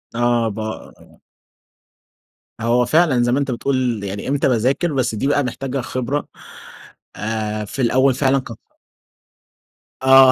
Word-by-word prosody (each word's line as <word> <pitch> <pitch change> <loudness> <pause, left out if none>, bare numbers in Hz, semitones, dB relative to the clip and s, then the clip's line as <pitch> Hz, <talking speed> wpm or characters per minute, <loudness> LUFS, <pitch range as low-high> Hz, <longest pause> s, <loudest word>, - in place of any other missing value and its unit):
آه 120 -1 +2
ب 110 - -7 2.0
هو 120 +1 +2
فعلًا 145 -3 +3
زي 120 - +1
ما 130 - +2
أنت 140 -2 -1
بتقول، 125 -3 -1
يعني 100 +1 -5
إمتى 140 0 +1
باذاكر 130 +7 +1
بس 125 -4 0
دي 120 +6 -1
بقى 145 0 +2
محتاجة 130 +1 -3
خبرة، 130 +4 -3 0.9
آآ، 110 0 -3
في 130 +6 -5
الأول 130 +2 +3
فعلًا 135 0 +2
ك 130 - -10 1.5
آه، 130 0 +7
125 Hz, 130 wpm, -20 LUFS, 115-135 Hz, 2.0 s, آه